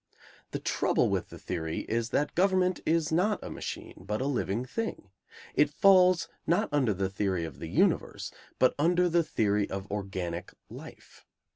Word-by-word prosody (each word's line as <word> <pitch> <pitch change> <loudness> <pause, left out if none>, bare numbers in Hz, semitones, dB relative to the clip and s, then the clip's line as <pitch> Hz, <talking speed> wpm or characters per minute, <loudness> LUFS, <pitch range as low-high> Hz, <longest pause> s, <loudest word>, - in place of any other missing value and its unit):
The - - -3
trouble - - +1
with - - -1
the - - -10
theory 80 -1 -3
is 115 +1 -2
that 145 +4 0
government 185 0 +2
is 160 -1 +2
not 195 +6 +2
a - - -6
machine, - - -6
but 105 - -2
a 130 - -1
living 125 -4 -1
thing. 130 - -5 0.4
It 150 0 +4
falls, 185 +2 +5 0.2
not 170 +2 +2
under 135 -6 +2
the 95 0 0
theory 95 -3 -1
of 75 -5 -9
the 80 - -5
universe, - - +1 0.3
but 130 - +4
under 175 +3 +3
the 170 0 +3
theory 105 -9 0
of 95 +1 -5
organic 95 -4 -4 0.2
life. - - -12
130 Hz, 165 wpm, -29 LUFS, -, 0.4 s, falls